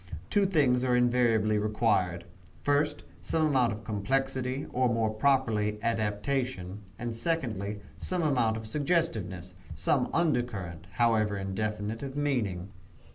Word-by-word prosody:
Two 200 -1 +4
things 135 -9 +3
are 125 -1 +2
invariably 120 -3 +3
required 105 -5 +1 0.4
first, 145 - +1 0.2
some 155 - +1
amount 130 -6 +3
of 105 0 -6
complexity, 130 +5 -1
or 125 0 +2
more 115 -2 +1
properly, 110 -3 +1
adaptation; 110 -2 -1 0.2
and, 120 -1 -4
secondly, 110 - -2 0.2
some 180 -2 -1
amount 120 -7 +2
of 110 - -7
suggestiveness 110 - -1 0.2
some 105 - +1
under 155 -7 +2
current, 95 -9 -7
however 110 -4 +2
indefinite, 105 +3 -3
of 135 0 -5
meaning. 105 -11 -1
115 Hz, 125 wpm, -29 LUFS, 105-135 Hz, 0.4 s, Two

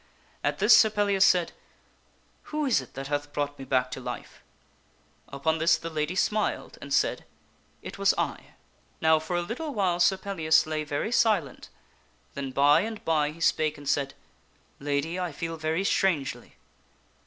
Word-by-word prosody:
At - - 0
this - - +6
Sir 220 - +6
Pellias 205 -2 +2
said, 180 -3 +3 0.5
" - - -38
Who 305 0 -2
is 240 - +2
it 130 - -15
that 135 +1 -5
hath 145 +1 -3
brought 145 -1 -3
me 135 - -7
back 130 -1 0
to - - -5
life - - -8 0.4
?" - - -37
Upon 160 +3 -1
this 165 +1 +4
the 165 - -7
lady 155 +3 -2
smiled 210 +2 -1
and 140 - -9
said, 135 - +1 0.3
" - - -37
It - - -8
was - - +4
I." - - -4 0.4
Now 160 0 +4
for 160 +3 -4
a 175 - 0
little 270 - -5
while 185 -4 +1
Sir 180 +2 +4
Pellias 165 -6 +2
lay 155 -1 -2
very 145 +8 -3
silent, 210 - +1 0.6
then 140 -1 -4
by 145 +3 +4
and 220 +1 -6
by 155 -2 +2
he 155 +2 -11
spake 155 -2 +1
and 145 -1 -11
said, 140 -1 0 0.3
" - - -38 0.3
Lady, 145 +5 -2
I 180 -2 -2
feel 165 +3 -5
very 160 +3 -1
strangely." 175 -8 -1
160 Hz, 180 wpm, -27 LUFS, 145-190 Hz, 0.6 s, this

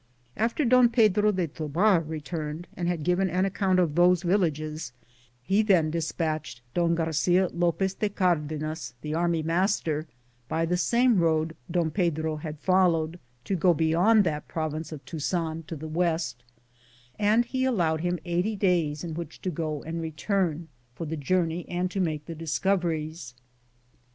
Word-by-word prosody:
After 230 +7 0
Don 250 0 +6
Pedro 210 -3 +4
de 185 -3 0
Tobar 165 +6 +2
returned 155 +1 -5
and 175 - -2
had 175 -3 -1
given 180 +3 +2
an 185 +3 +1
account 195 -1 +1
of 175 -5 +2
those 175 +2 +4
villages, 155 -7 -1 0.5
he 195 +10 +3
then 180 -8 +3
dispatched 155 -5 -3
Don 170 -1 +2
Garcia 170 +3 +2
Lopez 175 +2 0
de 210 +1 -1
Car 185 -4 +2
denas, 155 +1 -5
the 150 0 -4
army 170 -1 +1
master, 165 -2 0 0.4
by 165 +4 0
the 175 +2 0
same 235 +4 +3
road 160 -1 +1
Don 165 -2 0
Pedro 160 -3 0
had 150 0 -6
followed, 175 -1 +2 0.2
to 195 - -1
go 175 0 +3
beyond 175 +8 +4
that 150 -4 -2
province 155 0 -4
of 150 -3 -8
Tuzan 165 0 -3
to 165 - -5
the 155 +1 -7
west, 160 -6 -1 0.8
and 215 +3 +3
be 260 -1 0
allowed 170 -11 +1
him 175 +1 0
eighty 180 +5 0
days 170 -7 +1
in 165 -2 -4
which 165 -1 -7
to 185 - -1
go 155 -2 -3
and 165 +1 -4
return, 165 0 -1 0.3
for 165 - -5
the 160 +1 -3
journey 170 +3 0
and 180 +1 -1
to 195 - -3
make 155 -5 -1
the 165 - -6
discoveries. 165 -4 -2
170 Hz, 160 wpm, -27 LUFS, 155-185 Hz, 0.8 s, Don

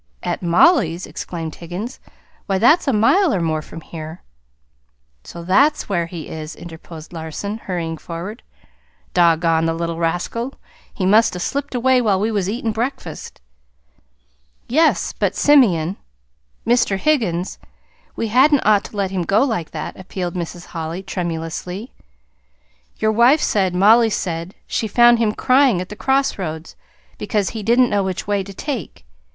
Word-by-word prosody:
"At - - -2
Mollie's!" 180 - +3
exclaimed 165 -3 -6
Higgins. 180 +9 -7 0.5
"Why, 195 -1 +1
that's 305 - +4
a - - +4
mile 290 - +3
or 195 - 0
more 160 -2 -1
from 165 +1 -10
here." 160 +1 -9 1.0
"So 170 - -9
that's 265 - +2
where 170 -4 0
he 165 -2 -8
is!" 155 0 -7
interposed 165 -1 -11
Larson, 170 +6 -5
hurrying 165 -5 -4
forward. 180 +6 -7 0.7
"Doggone 165 -1 +3
the 165 - 0
little 170 0 -3
rascal! 175 +10 -2 0.4
He 185 - -3
must 215 +1 +4
'a' - - -4
slipped 280 +8 -3
away 255 +1 +3
while 205 -5 +2
we 215 +3 0
was 200 -3 -1
eatin' 225 +1 -2
breakfast." 240 - -5 1.3
"Yes. 315 +6 +2
But, - - -1
Simeon, 195 - +4 0.7
Mr. 235 -4 +2
Higgins, 195 - 0 0.6
we 225 - -2
hadn't 270 +5 +4
ought 210 -2 +4
to 210 - -9
let 195 -2 -1
him 190 -2 -1
go 195 +8 +2
like 220 - -2
that," 155 +3 -6
appealed 180 -1 -5
Mrs. 175 0 -6
Holly 165 +2 -5
tremulously. 180 +3 -5 1.1
"Your 220 - +1
wife 240 +7 +5
said 190 -9 +1
Mollie 225 +5 +5
said 170 -3 -3
she 220 - -2
found 240 +2 +5
him 225 -2 +2
crying 255 -3 +3
at 180 - -5
the 210 - -7
crossroads, 190 - -1 0.4
because 210 -4 -1
he 220 - -5
didn't 240 +4 +3
know 205 - +2
which 190 -1 -3
way 205 -1 0
to 200 - -10
take. 205 - -6
195 Hz, 150 wpm, -20 LUFS, 170-235 Hz, 1.3 s, wife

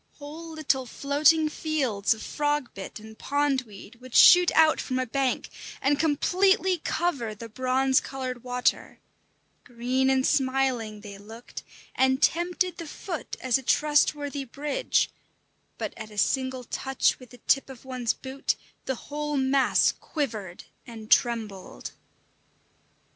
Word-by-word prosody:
Whole 305 +3 -9
little 275 -5 0
floating 300 +5 +3
fields 265 -10 0
of 220 - -10
frog 295 -3 -1
bit 195 +2 -8
and 220 +1 -12
pond 285 +1 0
weed 215 +3 -13
would 255 -1 -10
shoot 355 -1 +8
out 315 -1 +5
from 255 - -3
a 255 - 0
bank, 265 +1 -1 0.3
and 280 +1 +1
completely 365 +4 +2
cover 280 -11 -2
the 230 +2 -8
bronze 260 +3 +2
coloured 255 -2 -6
water; 250 0 -1 0.7
green 250 +2 0
and 265 0 +2
smiling 260 -5 0
they 200 -1 -10
looked, 225 +4 -10 0.3
and 260 0 +2
tempted 350 +2 +1
the 335 - -6
foot 335 0 -6
as 255 0 +2
a - - -8
trustworthy 290 0 +1
bridge; 290 - -1 0.7
but - - -4
at 215 0 -8
a 210 - -13
single 260 +3 0
touch 265 +3 0
with 255 -2 -14
the 245 - -14
tip 275 +2 +1
of 265 -1 -12
one's 255 -3 -1
boot, 265 +1 -2 0.3
the 265 - -1
whole 295 +3 -4
mass 265 0 +3
quivered 215 - -5 0.2
and 220 -2 -10
trembled. 215 - 0
265 Hz, 135 wpm, -26 LUFS, 235-295 Hz, 0.7 s, shoot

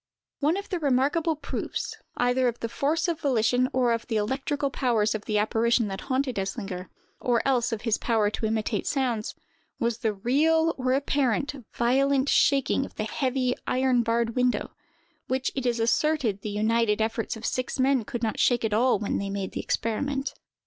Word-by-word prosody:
One 310 +5 +2
of 400 0 -5
the 365 - -1
most 330 - -9
remarkable 290 +5 +2
proofs, 300 - -4 0.2
either 245 +1 +2
of 235 -1 -2
the 230 - -3
force 305 +8 0
of 335 -2 -1
volition 250 -2 +2
or 250 -2 +2
of 230 - -3
the 230 - -2
electrical 270 +6 -1
powers 230 -6 +1
of 215 -1 -5
the 215 - 0
apparition 225 +1 +2
that 195 0 -5
haunted 260 -3 -1
Eslinger, 195 -2 -4 0.3
or 240 +1 +1
else 245 -3 +2
of 225 -2 -3
his 225 -3 +1
power 220 -3 +1
to 220 - -2
imitate 215 -1 -1
sounds, 245 -6 -1 0.4
was 235 0 -1
the 220 - +1
real, 320 +9 +2
or 255 -1 0
apparent, 275 -2 0
violent 270 +3 +2
shaking 275 -1 +3
of - - -9
the - - -2
heavy, 255 +2 0
iron 255 -1 +2
barred 230 0 0
window, 250 -1 +1 0.6
which 260 0 -1
it 265 -2 -2
is 240 -1 0
asserted 235 -2 +1
the 210 - -4
united 215 +1 +1
efforts 225 +1 -1
of 225 - -8
six 255 +2 -2
men 260 -2 +3
could 235 +2 -5
not 220 - -1
shake 240 -2 +3
at 215 - -1
all 245 +4 +3
when 210 - -2
they 200 - -3
made 195 -1 -3
the - - -4
experiment. 270 +5 -2
245 Hz, 185 wpm, -26 LUFS, 220-270 Hz, 0.6 s, shaking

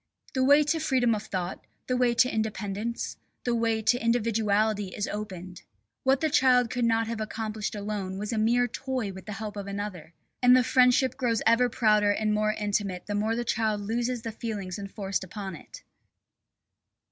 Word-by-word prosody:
The 260 - +1
way 285 +3 +6
to 320 +2 0
freedom 255 -6 +2
of 210 - -2
thought, 185 -1 -4 0.2
the 255 - 0
way 245 -1 +2
to 250 - +5
independence, 215 +1 -3 0.3
the 240 - 0
way 225 -1 0
to 245 +3 +2
individuality 215 -3 +1
is 205 - -2
opened. 185 -4 -6 0.4
What 265 0 +2
the 315 - +2
child 250 -4 +4
could 245 -1 0
not 225 0 +2
have 225 -1 -4
accomplished 215 0 -4
alone 200 -2 -4
was 210 +3 -3
a 220 - 0
mere 240 +3 +3
toy 255 -4 -3
with 190 +1 -11
the 210 - -4
help 210 0 -6
of 200 -1 -6
another. 200 -5 -6 0.3
And 250 0 +7
the 255 - +4
friendship 255 0 +3
grows 230 -3 0
ever 235 +2 +4
prouder 210 -3 +3
and 215 +1 +1
more 215 0 +1
intimate 205 -3 -2
the 205 - -4
more 215 +2 0
the 240 +1 -2
child 220 -2 0
loses 235 +3 -2
the 225 - -4
feelings 205 -4 -5
enforced 195 -1 -3
upon 190 0 -6
it. - - -12
220 Hz, 180 wpm, -27 LUFS, 205-240 Hz, 0.4 s, And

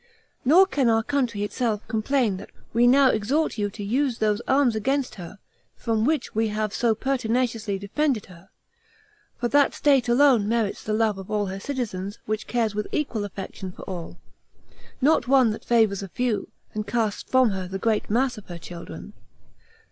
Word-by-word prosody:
Nor 335 +9 +6
can 265 -7 +1
our 225 0 +3
country 250 -6 -1
itself 215 0 -2
complain 220 -1 0
that - - -10 0.2
we 235 +2 +4
now 265 +1 +6
exhort 245 +6 0
you 205 0 0
to 205 +1 -8
use 250 +4 0
those 215 0 +1
arms 265 -4 +3
against 270 +5 0
her, 180 +1 -9 0.4
from 225 -1 0
which 310 +2 0
we 225 +1 +1
have 215 0 -2
so 230 -2 +2
pertinaciously 230 -4 -1
defended 225 +4 -1
her; 180 +1 -16 0.9
for 240 - 0
that 285 +1 +3
state 270 -5 +3
alone 240 -4 +4
merits 225 -3 0
the 215 - -3
love 215 -2 +1
of 190 - -9
all 210 -1 0
her 190 0 -5
citizens, 205 -6 -4
which 215 0 -3
cares 230 -3 0
with 210 0 -3
equal 235 -8 -1
affection 190 -1 -7
for - - -12
all; 175 -2 -7 0.8
not 295 0 +3
one 260 -4 +5
that 215 - -6
favors 220 -5 +2
a 195 - -5
few, 245 +1 -1 0.2
and 215 0 -4
casts 220 -1 -1
from 260 -3 +4
her 190 -1 -4
the 190 +1 -4
great 215 +2 0
mass 245 +1 +1
of 210 - -17
her 175 - -7
children. 170 0 -9
225 Hz, 180 wpm, -24 LUFS, 205-255 Hz, 0.9 s, Nor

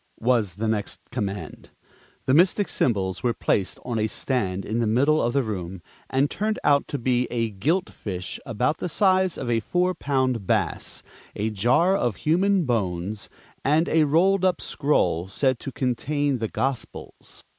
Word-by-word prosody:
was 115 -7 +1
the 110 +3 -2
next 110 -2 -2
command. 100 -8 -5 0.6
The 130 - +2
Mystic 185 +6 +4
Symbols 95 -6 0
were 120 -2 0
placed 95 -3 0
on 120 -3 -2
a 110 - +1
stand 100 -6 -2
in 110 +2 -2
the 115 - +1
middle 140 +8 +3
of 120 +1 0
the 140 - +2
room, 95 -5 -5 0.3
and 135 +2 +2
turned 215 +7 -2
out 140 -1 +3
to 145 - -3
be 125 -1 +1
a 115 -2 -1
gilt 155 - 0
fish 90 -3 -5
about 125 +6 -1
the 180 - -3
size 185 0 +2
of - - -5
a 115 -1 +2
four 180 +9 0
pound 130 - -1
bass, - - -1 0.3
a 110 +2 -1
jar 125 - +3
of 120 - 0
human 185 - +2
bones, 100 -4 -2 0.3
and 155 +4 +3
a 160 -1 +3
rolled 185 +6 +3
up 185 -3 +2
scroll 90 - 0
said 130 +5 0
to 135 - -6
contain 135 +2 -1
the 110 - -1
Gospels. 135 -1 -5
125 Hz, 165 wpm, -24 LUFS, 105-155 Hz, 0.6 s, Mystic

